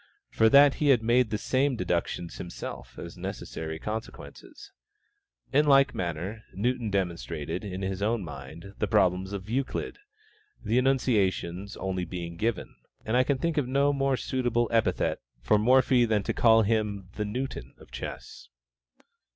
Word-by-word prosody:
for 110 - +4
that 140 +2 +7
he 150 - +3
had 125 -5 +4
made 120 +1 +3
the 105 - -1
same 130 +5 +1
deductions 85 -3 -2
himself, 85 - -8
as - - -8
necessary 80 0 -5
consequences. 110 +6 -8 0.8
In 150 +2 +4
like 140 -1 +5
manner, 90 +5 -4
Newton 120 +2 -1
demonstrated, 85 -3 -3
in 95 -1 -5
his 95 0 -3
own 110 0 0
mind, 75 +5 -9
the 105 - 0
problems 95 0 +2
of 100 -1 -6
Euclid, 130 - -3 0.6
the 115 +3 +1
enunciations 100 -8 0
only 95 -1 -2
being 85 -1 -6
given; 110 +2 -2 0.3
and 110 - 0
I 125 - +5
can 135 +1 0
think 165 +3 -1
of 135 - -2
no 140 +2 +2
more 135 -1 +1
suitable 120 -3 0
epithet 115 -1 +1 0.2
for 65 - +2
Morphy 125 +1 +4
than 110 -3 +1
to - - -2
call 115 -1 +5
him 105 -3 -1
"the 105 - -3
Newton 125 +6 -5
of - - -17
Chess." - - -8
110 Hz, 150 wpm, -27 LUFS, 95-125 Hz, 0.8 s, that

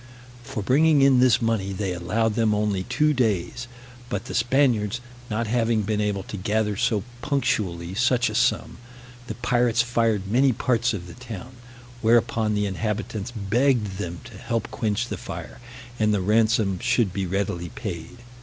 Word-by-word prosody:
For 110 -3 -5
bringing 145 +5 +4
in 135 -2 +5
this 125 -2 +4
money, 105 -4 0
they 95 -1 -2
allowed 105 +6 0
them 110 -1 +2
only 105 -2 0
two 140 +8 +1
days; 120 -1 -1 0.4
but 100 -1 -3
the - - -6
Spaniards 120 -3 +2 0.3
not 110 +2 -1
having 115 -1 +1
been 105 +1 -1
able 100 -2 -1
to 105 - -7
gather 105 +2 0
so 105 0 +1 0.2
punctually 95 - -1
such 125 +3 +2
a 110 - -3
sum, 120 - 0 0.5
the - - -5
pirates 120 -2 +2
fired 115 -4 +1
many 125 +6 +3
parts 115 -1 +1
of 90 -3 -6
the 90 - -10
town; 120 -1 -8 0.5
whereupon 115 -1 +2
the 105 0 +1
inhabitants 105 +2 -3
begged 110 -1 0
them 85 -5 -5
to - - -12
help 115 -2 -3
quench 110 +2 -1
the - - -4
fire, - - -8 0.4
and 105 -1 +3
the 105 - +2
ransom 110 -1 +2
should 120 -5 +1
be 95 -1 -2
readily 90 -2 -2
paid. 100 +3 -7
110 Hz, 165 wpm, -24 LUFS, 100-120 Hz, 0.5 s, in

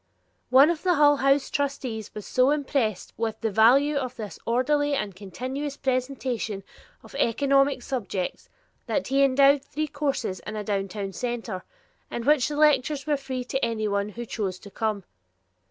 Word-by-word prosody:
One 275 +5 +7
of 330 - -4
the 360 -2 +2
Hull 290 -1 +5
House 275 +1 +2
trustees 260 -7 -3
was 210 - -6
so 255 +1 +3
impressed 275 -8 -1
with 225 -1 -2
the 225 - 0
value 265 +8 +5
of 255 -2 -3
this 215 -4 -7
orderly 290 +5 +2
and 210 -8 -3
continuous 260 +9 -5
presentation 255 -5 -2 0.4
of - - -15
economic 275 +2 +2
subjects 200 -8 -4 0.4
that - - -1
he 275 +1 +4
endowed 275 +1 +5
three 305 +2 -3
courses 280 -10 -2
in 215 - -7
a 210 - -3
downtown 195 -1 -3
center, 235 -6 -4 0.5
in 235 - -4
which 295 -4 +4
the 295 - -4
lectures 295 -1 +3
were 300 -1 +2
free 260 -2 -4
to 265 +2 -3
anyone 210 -3 0
who 235 +3 -7
chose 200 -5 -3
to 200 - -12
come. 215 -3 -2
255 Hz, 160 wpm, -26 LUFS, 215-280 Hz, 0.5 s, One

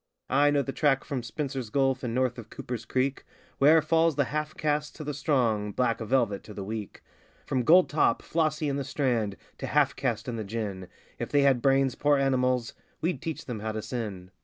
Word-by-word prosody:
I 145 +2 +5
know 145 -1 +2
the 135 - -4
track 135 -1 +2
from 140 -4 -3
Spencer's 130 0 -4
Gulf 135 +1 +1
and 120 -2 -3
north 125 -1 0
of 115 - -10
Cooper's 120 -3 -6
Creek 130 +4 -1 0.4
Where 155 +3 +6
falls 165 0 +3
the 140 - +3
half 150 0 -2
caste 150 -1 -1
to 155 - -7
the 150 0 -3
strong, 120 -8 +1
'black 120 -1 +1
velvet' 115 -3 +1
to 105 - -10
the 100 - -5
weak 105 0 -6 0.4
(From 130 - 0
gold 175 +9 +6
top 155 - +2
Flossie 155 -2 0
in 140 -1 -1
the 140 - -2
Strand 120 -8 -1 0.2
to - - -4
half 145 -1 +2
caste 120 -4 -2
and 115 -2 -3
the - - -2
gin 100 -3 -4 0.3
If - - -3
they 145 -1 +3
had 135 -3 +4
brains, 135 -1 +3
poor 145 0 +2
animals! 130 -3 +1 0.3
we'd 175 +3 -1
teach 160 -2 -5
them 120 -4 -5
how 110 +1 -3
to 110 -1 -4
sin.) 100 -7 -5
130 Hz, 210 wpm, -28 LUFS, 115-145 Hz, 0.4 s, Where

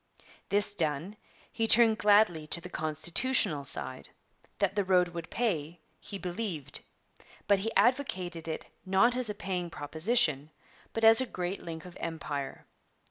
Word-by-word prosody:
This 205 0 +3
done, 160 +2 -2 0.4
he 225 - -1
turned 225 -1 +6
gladly 205 -7 +4
to 170 - +1
the - - -10
constitutional 160 - +1
side. 130 -1 -3 0.5
That - - +1
the 205 -1 0
road 180 -1 +3
would 170 -1 -7
pay, 170 -8 -2 0.2
he 200 - -7
believed; 180 -5 -2 0.7
but 200 -1 +4
he 225 +4 -2
advocated 185 - +1
it 160 - -4 0.2
not 195 +6 +3
as 250 -3 0
a 210 - -3
'paying 180 -3 -3
proposition,' 155 - +1 0.4
but 225 - -4
as 225 +3 +7
a 260 - -2
great 180 0 -4
link 165 0 -7
of 180 - -11
Empire. 150 -4 -5
180 Hz, 145 wpm, -30 LUFS, 160-215 Hz, 0.7 s, as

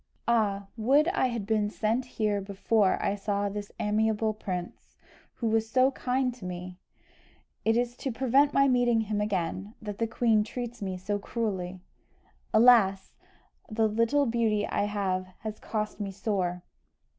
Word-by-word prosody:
"Ah, 205 -4 +1
would 275 +8 +4
I 355 -8 +1
had 235 -5 -3
been 210 -1 +1
sent 225 +4 -1
here 210 -4 -1
before 200 +1 +1
I - - 0
saw 200 0 -1
this 205 0 -6
amiable 215 +1 +1
prince, 180 -4 -6 0.4
who 235 - -4
was 220 0 +1
so 260 +2 +4
kind 255 -1 -1
to 240 - -14
me! 180 0 -6 0.9
It 225 +1 +3
is 240 0 0
to 270 - -3
prevent 265 +4 +3
my 275 0 +4
meeting 245 -3 +3
him 210 -1 -2
again, 200 +1 -2
that 210 -3 -7
the 230 - +1
queen 220 -1 +2
treats 240 +1 -6
me 190 -2 -3
so 205 +3 -2
cruelly. 190 -5 -3 0.7
Alas! 215 -4 +5 0.6
the 220 0 +2
little 230 +7 +2
beauty 225 -3 +1
I - - 0
have 190 -3 -1
has 215 0 -5
cost 210 -1 -3
me 205 -1 -3
sore!" 190 -3 -2
215 Hz, 155 wpm, -28 LUFS, 200-235 Hz, 0.9 s, Alas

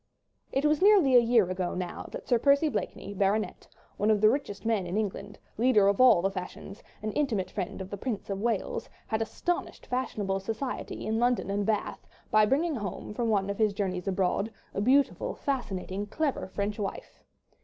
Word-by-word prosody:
It 270 +2 0
was 300 +2 +3
nearly 380 -10 +6
a - - +10
year 230 -4 +4
ago 185 -1 -2
now 180 -1 -5
that - - -8
Sir 240 - +3
Percy 280 +4 +4
Blakeney, 200 -7 -4
Bart., 200 +2 0 0.3
one 210 - +1
of 215 -1 +4
the 215 +1 +6
richest 230 -7 -4
men 215 -5 +1
in 180 +4 -2
England, 205 -1 -3 0.2
leader 230 -5 +5
of 200 +4 +3
all 235 -9 +7
the 195 - +1
fashions, 195 +2 -7 0.2
and 215 -1 -3
intimate 230 -11 0
friend 190 -2 -4
of 190 - -8
the 200 - -4
Prince 220 -1 -4
of 195 0 -3
Wales, 225 -3 -1 0.2
had 220 0 -1
astonished 350 +10 -3
fashionable 215 -6 -2
society 225 +6 -4
in 220 +1 0
London 240 -4 +1
and 200 0 -1
Bath 215 -2 -2 0.2
by 215 -1 +5
bringing 300 +4 +1
home, 205 -1 -5
from 230 +1 -1
one 200 -3 +2
of 200 +1 -4
his 215 -2 +3
journeys 190 -2 -2
abroad, 195 +3 0 0.2
a 200 - -1
beautiful, 270 +5 +2
fascinating, 205 -7 -3
clever, 290 +1 -1
French 205 +2 -3
wife. 200 -2 -6
215 Hz, 185 wpm, -28 LUFS, 195-250 Hz, 0.3 s, a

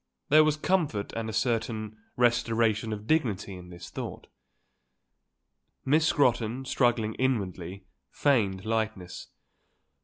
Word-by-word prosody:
There 155 +2 +7
was 155 -1 +2
comfort 155 - 0
and 115 -1 -3
a - - -3
certain 110 -1 -1 0.2
restoration 115 -2 +2
of 105 0 -5
dignity 110 -9 0
in 90 -1 -10
this 85 0 -10
thought. - - -6 1.6
Miss 155 +4 +3
Scrotton, 125 -3 +1
struggling 120 -4 +1
inwardly, 95 -7 -2 0.2
feigned 100 - +1
lightness. 110 -5 -3
110 Hz, 110 wpm, -28 LUFS, 105-130 Hz, 1.6 s, There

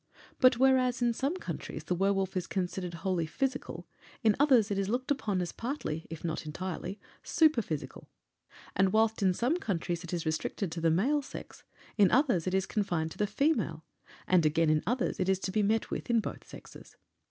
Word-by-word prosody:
But 255 -2 +6
whereas 255 -1 +3
in 240 -1 +3
some 275 +8 -1
countries - - -6
the - - -1
werwolf 195 +1 0
is 185 - -2
considered 180 -2 -3
wholly 180 -4 0
physical, 265 +8 -3 0.4
in 220 -2 +4
others 255 -8 +4
it 195 - 0
is 195 0 -1
looked 255 +5 -1
upon 210 -9 0
as 175 - -4
partly, 230 - -4
if 165 -1 -8
not 165 -2 -2
entirely, 185 +4 -5 0.2
superphysical. 235 - 0 0.7
And 190 0 +3
whilst 220 0 +2
in 185 -2 +3
some 255 - +1
countries 175 - -2
it 170 - -7
is 170 -2 -2
restricted 160 +3 -2
to 165 - -4
the 165 - +3
male 250 - +2
sex, - - -10 0.4
in 200 -3 +7
others 245 - +2
it 185 - +1
is 190 -1 +1
confined 175 -6 -1
to - - -12
the 210 - +2
female; 280 +10 0 0.4
and, 180 -2 +4
again, 155 +1 +3
in 155 0 +2
others 245 +2 0
it 185 0 0
is 190 - +3
to 190 - -2
be 215 +2 +1
met 215 +2 +1
with - - -4
in 235 -1 +4
both - - -6
sexes. - - -13
195 Hz, 195 wpm, -30 LUFS, 175-245 Hz, 0.7 s, in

